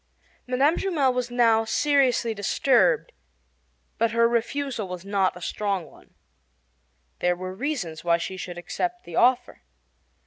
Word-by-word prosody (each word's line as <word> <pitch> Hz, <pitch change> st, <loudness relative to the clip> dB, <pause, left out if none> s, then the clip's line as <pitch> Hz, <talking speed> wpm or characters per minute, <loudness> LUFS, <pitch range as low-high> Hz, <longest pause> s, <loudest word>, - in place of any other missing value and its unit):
Mme. 270 Hz, +6 st, +2 dB
Jumel 300 Hz, -9 st, +1 dB
was 250 Hz, -1 st, -2 dB
now 230 Hz, -2 st, +3 dB
seriously 255 Hz, -2 st, +2 dB
disturbed, 270 Hz, -, +2 dB, 0.9 s
but 230 Hz, -, +3 dB
her 230 Hz, +1 st, +3 dB
refusal 235 Hz, -1 st, -2 dB
was 180 Hz, 0 st, -7 dB
not 195 Hz, -2 st, 0 dB
a -, -, -12 dB
strong 195 Hz, -1 st, -2 dB
one. -, -, -20 dB, 1.0 s
There 180 Hz, 0 st, +1 dB
were 185 Hz, +1 st, -6 dB
reasons 195 Hz, -, -4 dB
why 170 Hz, -1 st, +3 dB
she 170 Hz, +3 st, -5 dB
should 180 Hz, -1 st, -7 dB
accept 355 Hz, -, -4 dB
the -, -, -9 dB
offer. 250 Hz, -, +2 dB
230 Hz, 135 wpm, -25 LUFS, 185-270 Hz, 1.0 s, now